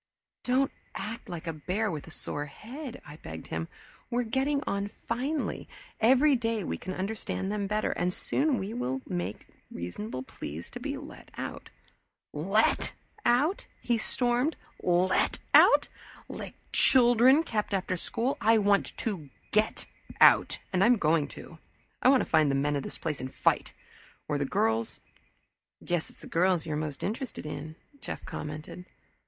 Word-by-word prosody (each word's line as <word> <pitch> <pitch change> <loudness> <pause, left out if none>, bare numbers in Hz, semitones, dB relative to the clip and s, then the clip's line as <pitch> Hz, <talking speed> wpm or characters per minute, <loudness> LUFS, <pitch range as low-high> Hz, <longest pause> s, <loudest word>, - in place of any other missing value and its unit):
"Don't 260 +2 +2 0.2
act 225 +2 -5
like 175 -2 -6
a 165 - -2
bear 185 +8 -1
with 155 -3 -6
a - - -9
sore 145 -2 -4
head," 250 - -8
I 150 +1 -10
begged 80 - -8
him. 80 0 -3 0.4
"We're 245 +1 +1
getting 275 +5 0
on 200 0 -1 0.2
finely. 270 +6 -2 0.3
Every 265 +5 +5
day 225 -3 -1
we - - -2
can 185 - -5
understand 195 0 -3
them 205 -1 -1
better, 215 +1 0
and 175 - 0
pretty - - -6
soon 285 -2 +1
we 195 - -3
can 130 - -2
make 90 +3 -4
a - - -28 0.2
reasonable 105 +9 -5
plea 80 - -7
to - - -8
be - - -3
let - - -11
out - - -6 0.4
" - - -59 0.2
"Let 220 - +3 0.3
out!" 290 +11 +2
he 235 -2 0
stormed. 245 +6 +2 0.3
"Let 180 +1 +2 0.2
out - - +7 0.4
like - - -7 0.2
children 250 +4 +6
kept 215 -9 -2
after 185 -1 0
school. 235 +9 -2
I 225 +1 +5
want 200 -1 +2
to 180 -11 -3 0.2
Get 215 +1 +1 0.3
Out, - - +6 0.2
and 185 +1 +4
I'm 240 +4 +6
going 155 -4 +2
to. 165 - -11 0.4
I - - +6
want 270 -1 +6
to - - -1
find 155 -2 +4
the 135 - +2
men 145 +2 +1
of 140 - 0
this - - -6
place 150 -4 -3
and 130 0 -5
fight! - - +1 0.6
or 150 -2 0
the 140 - +1
girls 110 -3 +1 0.4
" - - -25
"Guess 175 -2 -1
it's - - -16
the - - -9
girls 180 -1 +2
you're 155 -2 -2
most 150 -2 -3
interested 230 - -4
in," 155 +1 -6 0.2
Jeff - - -6
commented. 155 +4 -6
195 Hz, 170 wpm, -29 LUFS, 150-240 Hz, 0.6 s, out